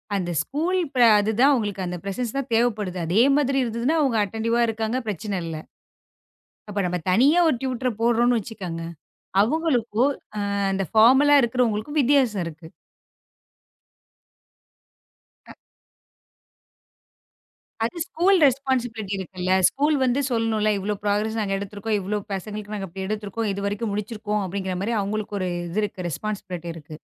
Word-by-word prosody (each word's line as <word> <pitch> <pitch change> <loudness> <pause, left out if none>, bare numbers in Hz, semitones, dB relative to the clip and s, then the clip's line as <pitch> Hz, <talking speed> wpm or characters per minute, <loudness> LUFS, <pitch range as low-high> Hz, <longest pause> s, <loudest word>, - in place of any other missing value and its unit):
அந்த 175 -3 -2
ஸ்கூல் 335 +6 -1 0.2
பிர 250 - +5 0.2
அது 210 +2 +1
தான் 280 +2 +6
உங்களுக்கு 205 -5 -2
அந்த 180 0 -4
பிரசன்ஸ் 220 +5 -3
தான் 270 -2 -3
தேவைப்படுது. 215 -5 0
அதே 180 +7 +3 0.2
மாதிரி 275 -2 +1
இருந்ததுன்னா 235 +6 0
அவங்க 260 -6 +1
அட்டென்டிவ்வா 225 +3 -1
இருக்காங்க. 225 +2 -2
பிரச்சனை 205 0 -3
இல்ல. 165 -1 -5 1.1
அப்போ 205 0 -2
நாம 180 0 -2
தனியா 275 - +5
ஒரு 275 - +2
டியூட்டர 255 -1 -1
போடுறோம்னு 235 +1 +3
வச்சுக்கங்க. 190 -6 -6 0.6
அவங்களுக்கும், 250 -2 +1 0.4
அ - - -1 0.2
அந்த 195 0 -1
ஃபார்மலா 265 +6 +6
இருக்குறவங்களுக்கும் 240 +3 0
வித்தியாசம் 255 -7 +3
இருக்கு. 165 +1 -9 2.8
அ. - - -11 2.3
அது 230 - -2
ஸ்கூல் 370 +4 +3
ரெஸ்பான்ஸிபிலிட்டி 245 -6 -1
இருக்குல்ல. 185 0 -4 0.2
ஸ்கூல் 295 +2 +1
வந்து 255 +1 +2
சொல்லணும்ல. 220 -2 +1
இவ்ளோ 205 +2 -2
பிராக்ரஸ் 210 +2 0
நாங்க 195 -2 -1
எடுத்துருக்கோம், 205 +2 -3
இவ்ளோ 205 +3 -2 0.2
பசங்களுக்கு 210 +2 -5
இப்புடி 210 +1 -7
நாங்க 195 -1 -6
எடுத்துருக்கோம். 210 +1 -3
இதுவரைக்கும் 200 +2 -2
முடிச்சு 210 +2 -4
இருக்கோம் 210 -1 -2
அப்படிங்கற 190 0 -3
மாதிரி 225 +4 -1
அவங்களுக்கு 205 0 -3
ஒரு 185 - -1 0.2
இது 210 +4 -1 0.2
ரெஸ்பான்ஸிபிலிட்டி 180 -1 -5
இருக்கு. 155 -1 -10
215 Hz, 130 wpm, -24 LUFS, 195-245 Hz, 2.8 s, தான்